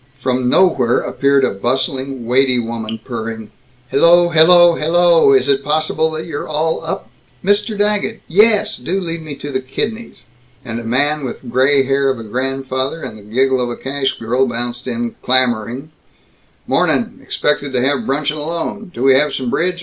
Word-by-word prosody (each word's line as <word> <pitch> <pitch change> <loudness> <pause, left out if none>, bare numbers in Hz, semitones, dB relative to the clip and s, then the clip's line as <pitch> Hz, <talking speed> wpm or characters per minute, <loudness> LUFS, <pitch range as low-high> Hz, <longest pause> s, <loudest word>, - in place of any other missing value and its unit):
From 125 -1 -1
nowhere 130 -9 +3
appeared 140 0 +1
a - - +2
bustling 130 +4 -2
weighty 130 +1 +2
woman, 115 -1 -4
purring, 110 -2 -6 0.4
"Hello, 175 +4 +5
hello, 175 +2 +6
hello, 165 -1 +3
is 130 -1 +3
it 140 0 +1
possible 155 +1 0
that 160 0 -5
you're 150 -4 -5
all 155 +1 -1
up - - -5 0.3
Mr. 205 +2 +1
Daggett. 210 +2 -1
Yes, 210 +4 +3
do 175 +10 -2
lead 165 -3 -5
me 155 -2 -7
to 145 +1 -7
the 130 -1 -2
kidneys." 220 - -5 0.4
And 115 -1 -4
a - - -7
man 145 +6 0
with 130 - -6
the 130 - -13
gray 135 +3 +3
hair 135 +1 +1
of 130 - -1
a 115 - -8
grandfather 130 +5 -3
and - - -6
the 110 - -12
giggle 130 +5 0
of 120 - -1
a 120 - -5
cash 135 0 -2
girl 125 +4 0
bounced 120 +1 -5
in 120 -1 -3
clamoring, 125 +2 0 0.7
"Mornin' - - 0
expected 145 -1 -1
to 125 - +1
have 140 +2 0
bruncheon 150 +2 -1
alone 170 +7 -4
do 125 - -5
we 135 0 +6
have 150 +3 +2
some 125 -3 -3
bridge? 180 +1 0
135 Hz, 175 wpm, -17 LUFS, 125-160 Hz, 0.7 s, hello